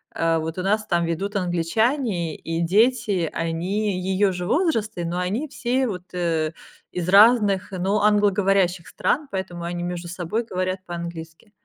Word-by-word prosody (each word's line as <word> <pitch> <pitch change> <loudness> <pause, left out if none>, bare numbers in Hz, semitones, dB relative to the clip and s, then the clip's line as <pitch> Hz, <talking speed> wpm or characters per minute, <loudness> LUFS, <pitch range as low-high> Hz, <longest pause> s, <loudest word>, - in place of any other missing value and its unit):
э, 165 0 +2
вот 160 +2 -4
у - - -2
нас 215 +2 +1
там 175 -4 +1
ведут 195 +5 -3
англичане, 180 - 0
и 165 +1 -3
дети, 205 -1 +2
они 180 +4 -1
ее 190 +1 +2
же 180 0 -4
возраста, 225 - 0
но 175 +2 -2
они 210 +12 -1
все 260 -1 -1
вот, 180 -4 -5 0.9
из 180 0 -3
разных, 205 -2 +5
ну, 190 +3 0
англоговорящих 195 -4 +2
стран, 295 0 -1
поэтому 185 -3 -4
они 175 0 -3
между 175 0 -4
собой 185 +6 -2
говорят 185 -1 -2
по-английски. 170 +2 -7
185 Hz, 145 wpm, -23 LUFS, 175-210 Hz, 0.9 s, разных